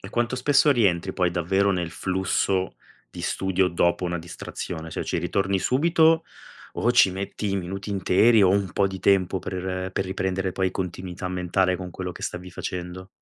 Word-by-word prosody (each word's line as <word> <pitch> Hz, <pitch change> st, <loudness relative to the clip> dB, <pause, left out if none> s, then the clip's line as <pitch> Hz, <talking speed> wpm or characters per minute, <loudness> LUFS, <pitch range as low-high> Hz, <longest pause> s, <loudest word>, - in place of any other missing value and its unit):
E 95 Hz, -, -9 dB
quanto 120 Hz, +2 st, 0 dB
spesso 145 Hz, +3 st, +4 dB
rientri, 95 Hz, -8 st, +2 dB
poi, 90 Hz, -1 st, +1 dB
davvero, 95 Hz, +3 st, +1 dB
nel 90 Hz, -3 st, -2 dB
flusso 95 Hz, +1 st, -1 dB, 0.4 s
di -, -, -9 dB
studio 95 Hz, -1 st, +1 dB
dopo 85 Hz, +1 st, +1 dB
una 85 Hz, -1 st, -2 dB
distrazione, 80 Hz, -1 st, -7 dB
cioè -, -, -3 dB
ci -, -, -2 dB
ritorni 95 Hz, +3 st, 0 dB
subito 160 Hz, -, +3 dB, 0.5 s
o 120 Hz, -, +1 dB
ci 120 Hz, -6 st, +6 dB
metti 100 Hz, +2 st, -4 dB
i 100 Hz, -, 0 dB
minuti 95 Hz, +3 st, -5 dB
interi, 100 Hz, +3 st, +4 dB
o 95 Hz, -, +5 dB
un 100 Hz, -1 st, +1 dB
po' 100 Hz, -, +2 dB
di 95 Hz, -1 st, -6 dB
tempo 95 Hz, -1 st, +3 dB
per 95 Hz, 0 st, -4 dB
per 95 Hz, -, -1 dB
riprendere, 95 Hz, 0 st, -2 dB
poi, 95 Hz, 0 st, 0 dB
continuità 90 Hz, 0 st, -5 dB
mentale 90 Hz, +1 st, +1 dB
con 90 Hz, 0 st, -7 dB
quello 90 Hz, +1 st, -5 dB
che -, -, -11 dB
stavi 90 Hz, +1 st, -5 dB
facendo? 90 Hz, +2 st, -6 dB
95 Hz, 175 wpm, -25 LUFS, 90-100 Hz, 0.5 s, ci